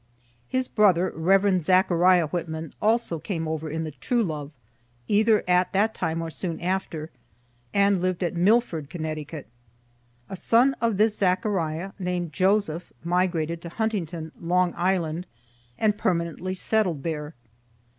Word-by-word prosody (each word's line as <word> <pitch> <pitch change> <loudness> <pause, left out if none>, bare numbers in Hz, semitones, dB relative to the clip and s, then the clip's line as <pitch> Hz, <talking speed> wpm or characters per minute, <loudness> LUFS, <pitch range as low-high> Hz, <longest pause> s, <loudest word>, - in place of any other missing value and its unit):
His 255 - 0
brother, 185 -4 +3
Rev. 190 +3 +3
Zechariah 180 0 +4
Whitman, 160 -1 -4
also 220 -6 +1
came 165 -2 -3
over 160 0 -3
in 160 +2 -3
the 155 - -5
"True 230 - 0
Love," 150 -6 -4 0.6
either 215 +1 +3
at 180 0 +2
that 210 +3 +2
time 165 -3 -2
or 165 - -5
soon 165 -1 -4
after, 170 -3 -3 0.6
and 200 -2 +3
lived 185 0 -1
at 175 0 -1
Milford, 180 - +2
Conn. 165 -2 -5 1.2
A - - -6
son 240 +8 +3
of 230 -4 +1
this 215 +1 +3
Zechariah, 185 -2 0
named 180 -3 -2
Joseph, 185 -2 +1
migrated 170 -2 0
to 170 - -7
Huntington, 170 -6 -3
Long 180 +1 +2
Island, 175 -1 -1 0.5
and 210 -1 +1
permanently 175 +1 -1
settled 185 -7 0
there. 155 -1 -4
180 Hz, 135 wpm, -25 LUFS, 165-200 Hz, 1.2 s, Zechariah